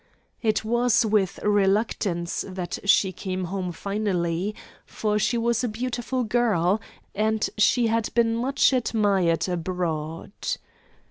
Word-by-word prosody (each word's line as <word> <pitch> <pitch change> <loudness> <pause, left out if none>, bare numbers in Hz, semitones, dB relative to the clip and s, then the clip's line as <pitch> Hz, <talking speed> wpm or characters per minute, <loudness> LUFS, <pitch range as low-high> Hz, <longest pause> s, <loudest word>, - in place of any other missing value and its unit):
It 215 -2 +1
was 240 +1 +3
with 205 -3 +1
reluctance 200 -3 +1
that 185 -2 -5
she 195 -1 +4
came 185 0 -4
home 180 0 -3
finally, 195 0 -2 0.3
for 210 -1 -1
she 240 +3 +1
was 235 +1 +1
a - - +1
beautiful 245 +2 -2
girl, 215 -4 +2 0.3
and 215 +1 +1
she 235 +3 +4
had 225 0 +1
been 230 -1 +3
much 270 +3 +2
admired 200 - +1
abroad. 165 -3 -3
210 Hz, 120 wpm, -25 LUFS, 185-230 Hz, 0.3 s, she